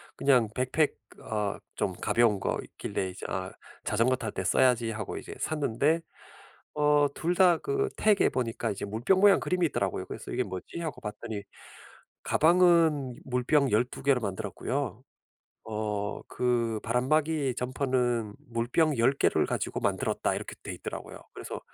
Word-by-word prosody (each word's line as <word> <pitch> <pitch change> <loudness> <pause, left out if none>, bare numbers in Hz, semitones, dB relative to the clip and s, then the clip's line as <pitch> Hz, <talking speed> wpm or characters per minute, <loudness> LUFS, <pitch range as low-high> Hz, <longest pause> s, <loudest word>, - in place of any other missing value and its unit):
그냥 125 -5 +4
백팩 130 +4 +1 0.3
어 105 -2 -2 0.2
좀 95 - -1
가벼운 115 -4 +3
거 - - -1
있길래 95 - -4
이제 90 - -9
'아 95 -1 -3 0.3
자전거 115 +5 +2
탈 110 -4 -4
때 95 - -4
써야지.' 120 +2 +3
하고 110 0 -5
이제 - - -8
샀는데 150 +1 +1 0.8
어 150 -1 +4
2 175 +2 0
다 180 -3 +5
그 410 0 0
태그에 210 -2 +4
보니까 115 -2 -2
이제 100 - -4
물병 115 - +1
모양 200 0 +6
그림이 180 -1 0
있더라고요. - - -2
그래서 - - -8
'이게 125 - 0
뭐지.' 95 - -7
하고 160 - -5
봤더니 105 0 -5 0.8
'가방은 160 -6 +4
물병 130 +2 +2
12 120 +4 0
개로 135 -3 +3
만들었고요. 95 -4 -3 0.6
어 105 -2 -3
그 115 -3 0
바람막이 140 +3 +1
점퍼는 125 -4 0
물병 120 +6 +1
10 130 +4 +4
개를 - - +2
가지고 - - -2
만들었다.' - - 0
이렇게 - - -6
돼 - - -5
있더라고요. - - -7 0.2
그래서 - - -6
125 Hz, 305 characters per minute, -28 LUFS, 110-150 Hz, 0.8 s, 모양